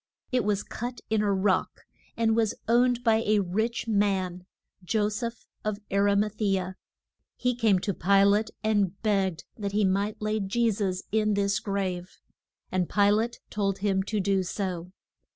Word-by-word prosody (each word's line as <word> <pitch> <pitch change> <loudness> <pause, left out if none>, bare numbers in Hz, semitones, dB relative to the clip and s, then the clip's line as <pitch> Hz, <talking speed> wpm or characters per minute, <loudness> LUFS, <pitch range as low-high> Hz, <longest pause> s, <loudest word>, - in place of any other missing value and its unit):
It 250 -2 +2
was 205 -1 0
cut 245 +2 -6
in 220 -1 +3
a 205 -1 +1
rock, 190 0 +1 0.4
and 225 -1 +2
was 225 -2 +1
owned 245 +1 +3
by 225 -2 +4
a 215 0 +3
rich 220 +6 -1
man 190 -4 0 0.4
Jo 210 +3 +1
seph 230 +2 -5 0.2
of 215 -1 -1
Ar 200 +1 +3
i 200 - +3
ma 210 +1 +2
the 200 -3 +1
a. 185 0 -4 0.6
He 250 0 0
came 225 -5 +3
to 200 +2 -2
Pi 195 +3 +4
late 205 +2 +3
and 205 -3 +1
begged 190 -7 +1 0.2
that 200 -1 -3
he 210 0 +3
might 200 +3 0
lay 215 0 -1
Je 225 +4 +1
sus 190 -3 -2
in 215 -1 +2
this 200 0 +1
grave, 190 -4 -3 0.5
and 185 -2 0
Pi 205 -1 +4
late 225 +3 0
told 195 -2 0
him 195 -1 +1
to 215 - 0
do 195 0 +2
so. 180 -2 -4
205 Hz, 175 wpm, -27 LUFS, 195-220 Hz, 0.6 s, by